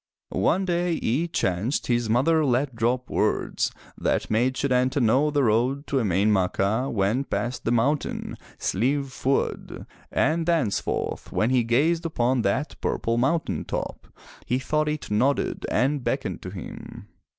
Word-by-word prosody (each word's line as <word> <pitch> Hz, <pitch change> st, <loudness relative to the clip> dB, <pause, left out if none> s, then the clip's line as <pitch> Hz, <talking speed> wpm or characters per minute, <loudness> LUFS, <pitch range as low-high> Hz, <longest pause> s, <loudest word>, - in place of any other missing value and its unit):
One 175 Hz, -, +2 dB
day 175 Hz, -1 st, 0 dB
it 160 Hz, +6 st, -1 dB
chanced 95 Hz, -, 0 dB
his 120 Hz, -2 st, 0 dB
mother 155 Hz, +8 st, +3 dB
let 130 Hz, -1 st, +1 dB
drop 120 Hz, +2 st, 0 dB
words -, -, 0 dB, 0.2 s
that -, -, -1 dB
made 125 Hz, +4 st, +2 dB
Setanta 130 Hz, +1 st, +1 dB
know 130 Hz, +5 st, +3 dB
the 145 Hz, -1 st, +1 dB
road 125 Hz, +5 st, +1 dB
to 140 Hz, -, -1 dB
Emain 100 Hz, -2 st, +2 dB
Macha 100 Hz, +6 st, +1 dB
went 110 Hz, +6 st, 0 dB
past 120 Hz, +1 st, -2 dB
the 115 Hz, -, +1 dB
mountain, 135 Hz, +6 st, 0 dB, 0.2 s
Slieve 135 Hz, +7 st, 0 dB
Fuad, 135 Hz, 0 st, -2 dB, 0.3 s
and 160 Hz, +3 st, +1 dB
thenceforth 155 Hz, -12 st, -1 dB
when 110 Hz, +3 st, +1 dB
he 125 Hz, -2 st, +3 dB
gazed 150 Hz, +9 st, +2 dB
upon 125 Hz, -4 st, +1 dB
that 130 Hz, +8 st, -1 dB
purple 115 Hz, +1 st, 0 dB
mountain 150 Hz, +6 st, 0 dB
top, -, -, -5 dB, 0.4 s
he 125 Hz, -, +1 dB
thought 150 Hz, +3 st, 0 dB
it 150 Hz, -6 st, -4 dB
nodded 130 Hz, +7 st, +1 dB
and 135 Hz, +3 st, +1 dB
beckoned -, -, -2 dB
to -, -, -6 dB
him. -, -, -9 dB
130 Hz, 145 wpm, -25 LUFS, 115-145 Hz, 0.4 s, mother